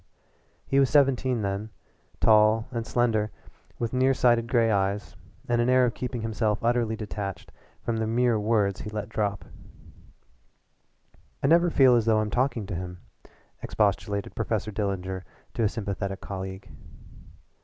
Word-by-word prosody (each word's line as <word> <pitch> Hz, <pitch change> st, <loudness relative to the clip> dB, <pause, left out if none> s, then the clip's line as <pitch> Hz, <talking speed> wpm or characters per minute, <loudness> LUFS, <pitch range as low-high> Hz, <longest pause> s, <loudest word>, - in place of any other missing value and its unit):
He 135 Hz, -, +2 dB
was 135 Hz, -2 st, +4 dB
seventeen 130 Hz, -5 st, +2 dB
then, 100 Hz, +2 st, -3 dB, 0.5 s
tall 110 Hz, +1 st, +4 dB
and 115 Hz, -2 st, -4 dB
slender, 110 Hz, -3 st, +1 dB, 0.5 s
with 115 Hz, 0 st, -3 dB
near 130 Hz, +1 st, +3 dB
sighted 120 Hz, -2 st, +3 dB
gray 115 Hz, -2 st, +2 dB
eyes 100 Hz, 0 st, -1 dB, 0.3 s
and 120 Hz, -1 st, +2 dB
an 120 Hz, -, +1 dB
air 130 Hz, 0 st, +5 dB
of 120 Hz, -, -1 dB
keeping 125 Hz, -2 st, -4 dB
himself 110 Hz, -1 st, 0 dB
utterly 115 Hz, -1 st, +1 dB
detached 105 Hz, -3 st, -6 dB, 0.3 s
from 115 Hz, -1 st, -1 dB
the 110 Hz, 0 st, -1 dB
mere 120 Hz, 0 st, +2 dB
words 105 Hz, -2 st, +1 dB
he 105 Hz, -, -6 dB
let 105 Hz, -1 st, -5 dB
drop. 105 Hz, -3 st, -2 dB, 2.0 s
"I -, -, +2 dB
never 170 Hz, +4 st, +5 dB
feel 130 Hz, -5 st, +5 dB
as 115 Hz, -2 st, +2 dB
though 110 Hz, -1 st, +3 dB
I'm 110 Hz, -1 st, -1 dB
talking 125 Hz, -3 st, 0 dB
to 95 Hz, -, -6 dB
him," 90 Hz, +1 st, -6 dB, 0.6 s
expostulated 100 Hz, -1 st, -1 dB
Professor 110 Hz, -1 st, -2 dB
Dillinger 95 Hz, -3 st, -3 dB, 0.3 s
to 115 Hz, -, -1 dB
a 105 Hz, -, +3 dB
sympathetic 100 Hz, -3 st, -4 dB
colleague. 95 Hz, 0 st, -7 dB
110 Hz, 145 wpm, -26 LUFS, 100-120 Hz, 2.0 s, air